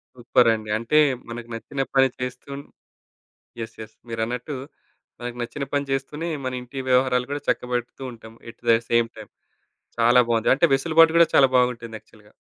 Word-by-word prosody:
సూపరండి. 115 -3 +2
అంటే 115 +7 +2 0.3
మనకు 120 0 -7
నచ్చిన 135 +4 -6 0.2
పని 135 0 +6
చేస్తూను 125 +3 -6 1.0
యెస్. 115 - -7
యెస్ 110 0 -10
మీరన్నట్టు 120 +5 -3 0.6
మనకు 120 0 -6
నచ్చిన 140 +4 -4
పని 145 0 0
జేస్తూనే, 145 +5 -3 0.2
మన 130 - -2
ఇంటి 125 +2 -9
వ్యవహారాలు 125 -1 +2
కూడా 145 0 -3
చక్కబెడుతూ 125 +1 -2
ఉంటాం. 110 -1 -13 0.2
ఎట్ 115 - -19
థ 115 0 +6
సేమ్ 115 0 +3
టైమ్ 110 -2 -11 0.7
చాలా 120 +2 +5
బావుంది. 115 -1 +1
అంటే 160 - +4
వెసులుబాటు 160 +3 +4
కూడా 170 - +7
చాలా 135 - +7
బాగుంటుంది 120 -2 0
యాక్చువల్‌గా. 105 -1 -22
125 Hz, 150 wpm, -23 LUFS, 115-135 Hz, 1.0 s, కూడా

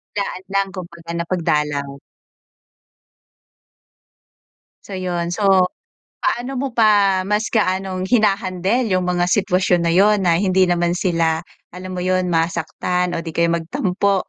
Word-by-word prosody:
Daan 200 -2 -3
lang, 195 0 +1
kumbaga 170 -2 -8
na 170 0 -2
pagdalaw. 150 -5 0 2.9
So, 195 -2 -6
'yun. 175 -2 -2
So, 200 +3 -2 0.7
paano 250 +2 -2
mo 265 -2 -3
pa 205 -4 +4
mas 210 +3 -1
gaanong 190 -3 -1
hina-handle 205 +1 +1
'yung 185 -1 +1
mga 180 0 0
sitwasyon 180 -3 +2
na 170 - +2
'yun 205 +3 +5
na 170 0 +3
hindi 190 -1 +3
naman 175 0 0
sila, 165 -3 0 0.2
alam 185 +1 -8
mo 180 - -4
'yun, 185 0 +1
masaktan 175 +2 -1
o 165 - -2
di 165 - -7
kaya 170 +1 +1
magtampo? 180 +4 0
185 Hz, 130 wpm, -20 LUFS, 170-195 Hz, 2.9 s, yun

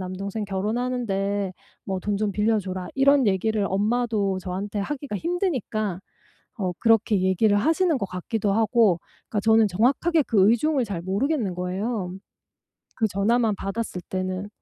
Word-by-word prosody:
남동생 195 +3 -4
결혼하는데 200 -2 -1 0.3
뭐 190 -1 -3
돈 205 +2 -1
좀 210 0 -1
빌려 215 +2 +2
줘라." 185 -2 -5
이런 275 -1 +4
얘기를 205 +1 +1
엄마도 210 -1 0
저한테 195 +3 -4
하기가 280 +1 -4
힘드니까 250 - -2 0.6
어 185 -3 -1
그렇게 225 -3 +3
얘기를 190 +3 +3
하시는 325 - +2
것 200 - -2
같기도 200 +3 -2
하고. 220 -4 +3 0.3
그러니까 210 - -1
저는 220 0 +4
정확하게 275 - +2
그 205 -7 +3
의중을 265 +2 +2
잘 190 -5 -5
모르겠는 205 - -1
거예요 185 +1 -3 0.8
그 220 -3 +1
전화만 215 +2 +1
받았을 195 -1 -4
때는. 185 +1 -3
210 Hz, 330 characters per minute, -24 LUFS, 190-235 Hz, 0.8 s, 이런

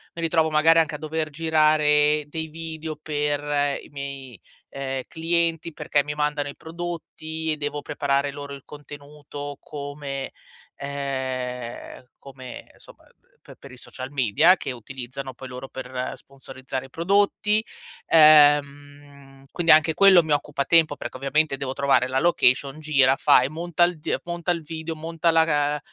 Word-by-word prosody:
mi 170 - -6
ritrovo, 160 -1 +2
magari, 160 +2 +4
anche 155 -1 0
a - - -5
dover 155 +1 -3
girare 150 -1 +3
dei 160 +1 -5
video 160 -1 -7
per 145 -1 -1
i - - -14
miei, 140 - -8 0.3
ehm, 135 -1 -5
clienti 165 0 0
perché 145 -1 0
mi 150 0 -5
mandano 150 -1 -1
i - - -9
prodotti 160 -1 -6
e - - -6
devo 145 0 -4
preparare 140 0 -1
loro 145 -1 -8
il 140 - -11
contenuto 145 -1 -10
come 145 -2 -6 0.4
ehm, 130 -3 -5
come, 130 -2 -11
somma, - - -18 0.4
pe - - -15
per - - -14
i - - -12
social 130 +2 -9
media 140 - +4
che 135 - -5
utilizzano 130 +2 -8
poi 130 +2 -10
loro 125 +1 -8
per 130 -1 -5
sponsorizzare 135 -1 -8
i - - -27
prodotti. 205 +5 +1 0.4
Ehm, 145 -2 +3
quindi 175 -2 +3
anche 155 +1 +5
quello 195 0 +7
mi 155 - -5
occupa 145 -1 -1
tempo 160 -3 +4
perché 130 - -7
ovviamente 140 +1 0
devo 135 -1 -4
trovare 135 -2 +2
la 130 +1 0
location, 140 -3 +2
gira, 140 -4 +3
fa - - +5
e 130 - -1
monta 170 +2 -1
il 175 -1 +1
die - - -2
monta 170 0 -3
il 170 -1 -2
video, 160 +1 -6
monta 165 +1 -1
la 150 -3 +2
ehm, 150 - -5
145 Hz, 155 wpm, -24 LUFS, 135-160 Hz, 0.4 s, quello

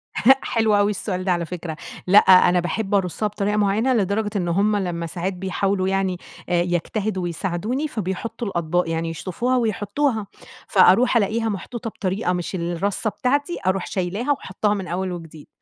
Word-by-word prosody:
هأ 265 +5 +6
حلو 220 -2 +1
أوي 205 +1 +3
السؤال 185 -2 -3
ده 185 - +1
على 170 -1 0
فكرة. 165 -1 -6 0.3
لأ، 200 +3 +8
أنا 180 -1 +6
باحب 195 +4 -1
أرُصّها 195 +2 0
بطريقة 210 0 -1
معيّنة، 210 +5 +2
لدرجة 205 0 0
إن 180 -3 0
هم 200 +5 +2
لمّا 175 -4 -2
ساعات 180 +3 -3
بيحاولوا 190 +1 -1
يعني 190 -1 0 0.3
آآ 175 -1 +3
يجتهدوا 185 +3 -1
ويساعدوني، 195 - -2
فبيحُطُّوا 225 0 -4
الأطباق، 170 -1 0
يعني 165 0 -1
يشطّفوها 200 +10 -1
ويحطّوها. 220 0 0 0.4
فأروح 220 +6 +5
ألاقيها 225 +2 +1
محطوطة 225 +4 -5
بطريقة 190 -1 -2
مش 180 +2 -3
الرّصّة 180 +5 -1
بتاعتي، 285 +9 -1
أروح 190 -1 +1
شايلاها 200 +9 -2
وحاطّاها 210 -5 -1
من 190 -3 -4
أول 185 +2 -2
وجديد. 165 -3 -9
195 Hz, 160 wpm, -22 LUFS, 180-215 Hz, 0.4 s, لأ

